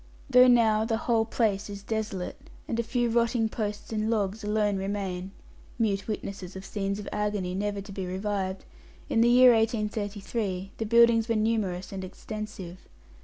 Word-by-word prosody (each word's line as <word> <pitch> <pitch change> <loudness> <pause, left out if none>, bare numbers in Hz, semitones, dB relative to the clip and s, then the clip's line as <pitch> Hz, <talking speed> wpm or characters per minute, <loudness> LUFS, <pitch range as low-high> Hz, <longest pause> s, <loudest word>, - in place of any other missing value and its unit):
Though 250 0 +8
now 225 -3 +4
the 225 0 0
whole 225 -2 +3
place 215 -3 0
is 200 -1 -7
desolate, 210 -4 -4 0.2
and 230 - -2
a - - +4
few 240 +1 0
rotting 230 -1 +2
posts 210 -1 -4
and 215 0 0
logs 210 -1 -1
alone 210 -1 +1
remain 190 -2 -3 0.5
mute 200 -4 0
witnesses 195 -4 -5
of 190 0 -7
scenes 200 0 -2
of 210 - -7
agony 205 -3 -1
never 200 +1 -2
to 200 +1 -10
be 190 -1 -4
revived 190 0 -3 0.4
in 225 - +3
the 235 - +5
year 250 0 +8
1833 210 -3 -1
the 225 - -1
buildings 235 0 +5
were 230 - +2
numerous 215 -5 0
and 190 -1 -5
extensive. 190 -2 -7
210 Hz, 165 wpm, -28 LUFS, 195-225 Hz, 0.5 s, Though